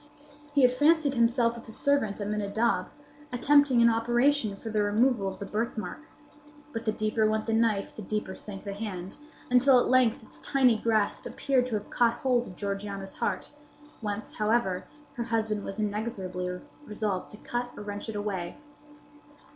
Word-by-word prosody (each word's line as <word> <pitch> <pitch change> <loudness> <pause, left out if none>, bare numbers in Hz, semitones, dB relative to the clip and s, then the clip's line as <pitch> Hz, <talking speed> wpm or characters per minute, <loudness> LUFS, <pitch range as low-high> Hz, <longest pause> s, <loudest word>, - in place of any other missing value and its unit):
He 280 - +5
had 250 - +7
fancied 295 +2 +3
himself 235 -1 +2
with 235 - -11
his 220 - -8
servant 280 -8 +1
Aminadab, 210 +2 0 0.4
attempting 270 -1 +4
an 235 - +7
operation 240 0 +2
for 220 +3 -7
the 210 -1 +1
removal 210 +1 +2
of 190 - -4
the 200 - -6
birthmark; 225 +8 -4 0.7
but 225 - -4
the 215 - +2
deeper 215 0 +1
went 215 0 0
the 225 - -1
knife, 225 -3 +1
the - - -7
deeper 210 -1 -3
sank 195 0 -8
the 200 - -4
hand, 195 -3 -6 0.3
until 250 +1 +6
at - - +2
length 255 -3 +3
its - - -16
tiny 260 -4 +3
grasp 215 -2 0
appeared 260 -3 +1
to 235 - -2
have 210 0 -5
caught 235 -1 +3
hold 245 -1 +1
of 180 - -10
Georgiana's 200 0 -4
heart; - - -2 0.5
whence, 210 -1 -4
however, 210 -4 +1 0.3
her 240 - -3
husband 220 -3 -1
was 195 +2 -6
inexorably 190 -4 -3 0.2
resolved 210 -6 -3
to 210 - -10
cut 240 +3 -3
or 210 - -6
wrench 205 +1 -6
it 220 - -5
away. 195 -4 -3
220 Hz, 170 wpm, -28 LUFS, 205-240 Hz, 0.7 s, had